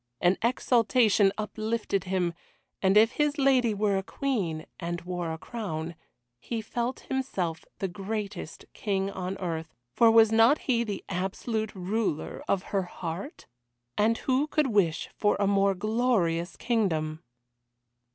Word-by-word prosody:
An 180 Hz, +2 st, +3 dB
exaltation 230 Hz, -3 st, +3 dB
uplifted 215 Hz, -2 st, -2 dB
him. 180 Hz, -2 st, 0 dB, 0.5 s
And 195 Hz, +1 st, +4 dB
if 225 Hz, +2 st, +6 dB
his 295 Hz, +2 st, 0 dB
lady 265 Hz, -4 st, +4 dB
were 200 Hz, -1 st, +1 dB
a -, -, -5 dB
Queen, 190 Hz, -, -2 dB
and 175 Hz, -1 st, -3 dB
wore 175 Hz, -2 st, -3 dB
a 160 Hz, -, -4 dB
crown, 170 Hz, -5 st, -5 dB, 0.5 s
he 230 Hz, -, -4 dB
felt 240 Hz, +3 st, -3 dB
himself 190 Hz, -12 st, -3 dB
the 195 Hz, -, -1 dB
greatest 200 Hz, -2 st, -5 dB
king 195 Hz, -2 st, -1 dB
on 190 Hz, 0 st, -4 dB
earth, 165 Hz, -3 st, -4 dB, 0.2 s
for 230 Hz, -, +6 dB
was 225 Hz, -1 st, +6 dB
not 225 Hz, +6 st, +6 dB
he 235 Hz, -3 st, +2 dB
the 205 Hz, -4 st, -4 dB
absolute 205 Hz, +4 st, -2 dB
ruler 190 Hz, -3 st, -2 dB
of 195 Hz, -1 st, +1 dB
her 195 Hz, -, +3 dB
heart? 175 Hz, -, -6 dB, 0.5 s
And 225 Hz, +2 st, +3 dB
who 265 Hz, +3 st, +1 dB
could 305 Hz, 0 st, +1 dB
wish 170 Hz, -6 st, +2 dB
for 205 Hz, -, +2 dB
a 200 Hz, -, +3 dB
more 195 Hz, 0 st, +3 dB
glorious 195 Hz, -5 st, 0 dB
kingdom? 160 Hz, -10 st, 0 dB
200 Hz, 140 wpm, -28 LUFS, 180-230 Hz, 0.5 s, if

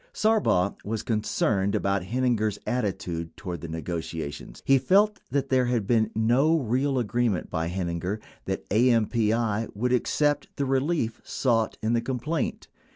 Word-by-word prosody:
Sarbaugh 210 Hz, -, +2 dB
was 110 Hz, +1 st, -3 dB
concerned 105 Hz, -3 st, 0 dB
about 100 Hz, 0 st, +1 dB
Heininger's 110 Hz, -2 st, 0 dB
attitude 95 Hz, -8 st, -3 dB
toward 90 Hz, -5 st, -5 dB
the 85 Hz, -, -6 dB
ne 80 Hz, 0 st, -5 dB
gotiations; 80 Hz, -7 st, -5 dB
he 135 Hz, 0 st, +5 dB
felt 205 Hz, +10 st, +3 dB
that 140 Hz, +1 st, -1 dB
there 130 Hz, -1 st, +3 dB
had 120 Hz, -4 st, 0 dB
been 110 Hz, 0 st, +2 dB
no 125 Hz, +9 st, +3 dB
real 135 Hz, +1 st, 0 dB
agreement 120 Hz, -4 st, 0 dB
by 80 Hz, +1 st, -1 dB
Heininger 90 Hz, +2 st, -2 dB, 0.3 s
that -, -, -3 dB
AMPI 115 Hz, -1 st, +2 dB
would 125 Hz, +4 st, 0 dB
accept 145 Hz, +4 st, +1 dB
the 140 Hz, -, -1 dB
relief 135 Hz, -2 st, 0 dB
sought 115 Hz, -4 st, 0 dB
in 110 Hz, +2 st, +1 dB
the 115 Hz, -, +2 dB
complaint. 130 Hz, +4 st, -2 dB
115 Hz, 145 wpm, -26 LUFS, 100-130 Hz, 0.3 s, he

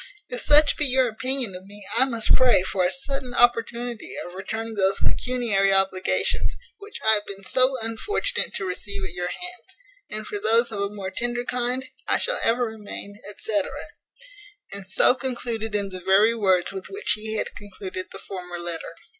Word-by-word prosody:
If 245 Hz, -, -3 dB
such 295 Hz, 0 st, +8 dB
be 295 Hz, -, +4 dB
your 260 Hz, 0 st, +4 dB
opinion 255 Hz, -1 st, -1 dB
of 185 Hz, +1 st, -10 dB
me, 205 Hz, 0 st, -11 dB
I 260 Hz, -, +6 dB
must 230 Hz, -4 st, +3 dB
pray 250 Hz, -7 st, +5 dB
for 190 Hz, 0 st, -1 dB
a 180 Hz, -, +3 dB
sudden 270 Hz, +1 st, -2 dB
opportunity 240 Hz, -1 st, +1 dB
of 175 Hz, -, -10 dB
returning 220 Hz, +4 st, -5 dB
those 195 Hz, -2 st, +2 dB
pecuniary 230 Hz, -6 st, +1 dB
obligations, 195 Hz, -1 st, +1 dB, 0.2 s
which 410 Hz, +1 st, -9 dB
I 220 Hz, -, +7 dB
have 210 Hz, -1 st, +1 dB
been 195 Hz, 0 st, -9 dB
so 255 Hz, +5 st, +3 dB
unfortunate 320 Hz, -, -1 dB
to 195 Hz, -, 0 dB
receive 195 Hz, +2 st, -4 dB
at 185 Hz, -3 st, -5 dB
your 180 Hz, 0 st, -3 dB
hands; 360 Hz, -, -6 dB, 0.3 s
and 215 Hz, 0 st, -5 dB
for 205 Hz, -, -5 dB
those 230 Hz, +3 st, +3 dB
of 205 Hz, -, -4 dB
a 200 Hz, -, -1 dB
more 200 Hz, -2 st, -6 dB
tender 240 Hz, +3 st, -1 dB
kind, 250 Hz, +1 st, -1 dB, 0.2 s
I -, -, +3 dB
shall -, -, 0 dB
ever 240 Hz, +2 st, +2 dB
remain, 210 Hz, -2 st, -9 dB, 0.2 s
&c." 210 Hz, -2 st, 0 dB, 1.1 s
And 200 Hz, -1 st, -8 dB
so 190 Hz, -, +4 dB
concluded 235 Hz, -4 st, -4 dB
in 200 Hz, -1 st, -1 dB
the 185 Hz, -1 st, -8 dB
very 200 Hz, +5 st, +4 dB
words 190 Hz, -5 st, +2 dB
with 190 Hz, -1 st, -7 dB
which 400 Hz, -, -2 dB
he 215 Hz, +1 st, 0 dB
had -, -, -3 dB
concluded 190 Hz, -2 st, -7 dB
the -, -, -9 dB
former 180 Hz, -2 st, -7 dB
letter. 170 Hz, -1 st, -5 dB
215 Hz, 180 wpm, -24 LUFS, 195-245 Hz, 1.1 s, such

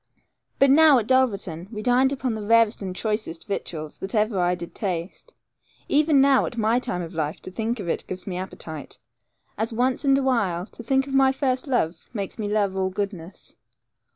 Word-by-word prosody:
But 275 Hz, 0 st, +5 dB
now, 305 Hz, -1 st, +7 dB
at 230 Hz, -, 0 dB
Dulverton, 200 Hz, -9 st, +1 dB
we 210 Hz, -1 st, -6 dB
dined 255 Hz, +3 st, +3 dB
upon 260 Hz, -3 st, -2 dB
the 220 Hz, -, -4 dB
rarest 230 Hz, +1 st, +3 dB
and 185 Hz, -2 st, -5 dB
choicest 210 Hz, -6 st, -3 dB
victuals 155 Hz, -6 st, -5 dB
that 195 Hz, +4 st, -5 dB
ever 210 Hz, -2 st, +1 dB
I 180 Hz, 0 st, +2 dB
did 170 Hz, -1 st, -8 dB
taste. 180 Hz, -4 st, -5 dB, 0.5 s
Even 295 Hz, 0 st, +4 dB
now, 270 Hz, -1 st, +4 dB
at 235 Hz, -, -8 dB
my 225 Hz, +2 st, +2 dB
time 180 Hz, -8 st, -3 dB
of 165 Hz, -, -8 dB
life, 155 Hz, -1 st, -2 dB
to -, -, -7 dB
think 225 Hz, +4 st, -2 dB
of 190 Hz, -, -5 dB
it -, -, -2 dB
gives 185 Hz, 0 st, -6 dB
me 185 Hz, -, -4 dB
appetite, 160 Hz, -5 st, -7 dB, 0.6 s
as 225 Hz, +2 st, -1 dB
once 250 Hz, +4 st, 0 dB
and 275 Hz, -1 st, +4 dB
awhile 220 Hz, -10 st, 0 dB
to 235 Hz, -, -12 dB
think 265 Hz, +3 st, +1 dB
of 275 Hz, -, -7 dB
my 270 Hz, 0 st, +5 dB
first 265 Hz, 0 st, -1 dB
love 180 Hz, -11 st, -1 dB
makes 200 Hz, +1 st, -4 dB
me 210 Hz, -, -2 dB
love 205 Hz, -2 st, 0 dB
all 190 Hz, 0 st, 0 dB
goodness. 190 Hz, -3 st, -6 dB
215 Hz, 195 wpm, -24 LUFS, 185-255 Hz, 0.6 s, now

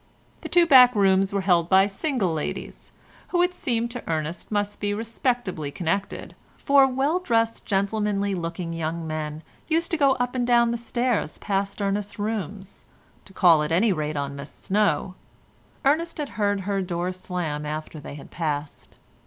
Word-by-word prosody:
The -, -, -7 dB
two 350 Hz, -1 st, +5 dB
back 250 Hz, -5 st, +7 dB
rooms 195 Hz, -1 st, +3 dB
were 200 Hz, -1 st, 0 dB
held 175 Hz, -3 st, +2 dB
by 190 Hz, 0 st, +6 dB
single 205 Hz, -, -1 dB
ladies, 155 Hz, -, -5 dB, 0.4 s
who 355 Hz, -1 st, +2 dB
it 360 Hz, 0 st, +1 dB
seemed 235 Hz, -7 st, -2 dB
to 245 Hz, 0 st, -6 dB
Ernest 160 Hz, +4 st, -3 dB
must 205 Hz, 0 st, -1 dB
be 205 Hz, 0 st, -1 dB
respectably 225 Hz, -, -2 dB
connected, 185 Hz, +6 st, -3 dB, 0.2 s
for 275 Hz, -1 st, +5 dB
well 275 Hz, +7 st, 0 dB
dressed 230 Hz, -9 st, 0 dB
gentlemanly 200 Hz, 0 st, 0 dB
looking 170 Hz, -1 st, -4 dB
young 165 Hz, 0 st, -3 dB
men 155 Hz, 0 st, -4 dB, 0.2 s
used 330 Hz, +1 st, 0 dB
to 330 Hz, -, +1 dB
go 280 Hz, -3 st, +4 dB
up 245 Hz, -1 st, -2 dB
and 245 Hz, -2 st, -1 dB
down 235 Hz, -1 st, +4 dB
stairs 235 Hz, -6 st, -1 dB
past 200 Hz, 0 st, -2 dB
Ernest's 200 Hz, +1 st, -2 dB
rooms 205 Hz, -2 st, -5 dB, 0.4 s
to 190 Hz, -, -15 dB
call 170 Hz, -5 st, +5 dB
at 150 Hz, +1 st, -2 dB
any 195 Hz, +5 st, +3 dB
rate 155 Hz, -2 st, -3 dB
on 140 Hz, 0 st, -3 dB
Miss 140 Hz, +1 st, -7 dB
Snow—Ernest 210 Hz, -, -2 dB
had 295 Hz, -3 st, -3 dB
heard 205 Hz, -2 st, 0 dB
her 195 Hz, 0 st, -1 dB
door 175 Hz, 0 st, -2 dB
slam 180 Hz, -5 st, -4 dB
after 155 Hz, +1 st, -5 dB
they 145 Hz, -, -9 dB
had 145 Hz, -, -12 dB
passed. 150 Hz, -3 st, -4 dB
200 Hz, 160 wpm, -24 LUFS, 165-235 Hz, 0.4 s, back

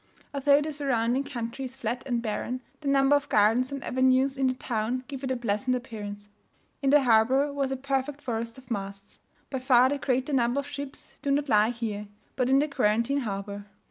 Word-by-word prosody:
Although 280 Hz, +1 st, +4 dB
the 310 Hz, +1 st, -3 dB
surrounding 265 Hz, -3 st, 0 dB
country 250 Hz, -2 st, -5 dB
is 260 Hz, 0 st, -8 dB
flat 245 Hz, -1 st, -3 dB
and 240 Hz, -2 st, -1 dB
barren, 235 Hz, +3 st, -3 dB, 0.2 s
the 290 Hz, -, -6 dB
number 275 Hz, +1 st, +4 dB
of 285 Hz, 0 st, -1 dB
gardens 225 Hz, +5 st, +3 dB
and 275 Hz, -1 st, -5 dB
avenues 260 Hz, +1 st, +2 dB
in 265 Hz, -1 st, +1 dB
the 255 Hz, -, 0 dB
town 240 Hz, +1 st, -2 dB
give 275 Hz, -2 st, -7 dB
it 265 Hz, -, -2 dB
a 260 Hz, -, 0 dB
pleasant 240 Hz, +2 st, 0 dB
appearance. 205 Hz, -4 st, -7 dB, 0.5 s
In 275 Hz, -, +2 dB
the 290 Hz, 0 st, +6 dB
harbour 255 Hz, +5 st, +3 dB
was 275 Hz, -1 st, -1 dB
a 265 Hz, -, -1 dB
perfect 275 Hz, +1 st, -2 dB
forest 230 Hz, -2 st, -4 dB
of 255 Hz, -2 st, -15 dB
masts. 200 Hz, -1 st, -6 dB, 0.3 s
By 265 Hz, -, -2 dB
far 255 Hz, 0 st, +5 dB
the 285 Hz, +1 st, -1 dB
greater 260 Hz, +2 st, 0 dB
number 245 Hz, +1 st, +2 dB
of 280 Hz, -, -12 dB
ships 285 Hz, -1 st, -6 dB
do 280 Hz, -, -2 dB
not 280 Hz, +1 st, +1 dB
lie 215 Hz, -1 st, +4 dB
here, 220 Hz, -3 st, -4 dB, 0.3 s
but 255 Hz, -1 st, +1 dB
in 270 Hz, -, +5 dB
the 295 Hz, +2 st, +3 dB
quarantine 245 Hz, 0 st, +1 dB
harbour. 200 Hz, -3 st, -5 dB
255 Hz, 205 wpm, -27 LUFS, 230-275 Hz, 0.5 s, the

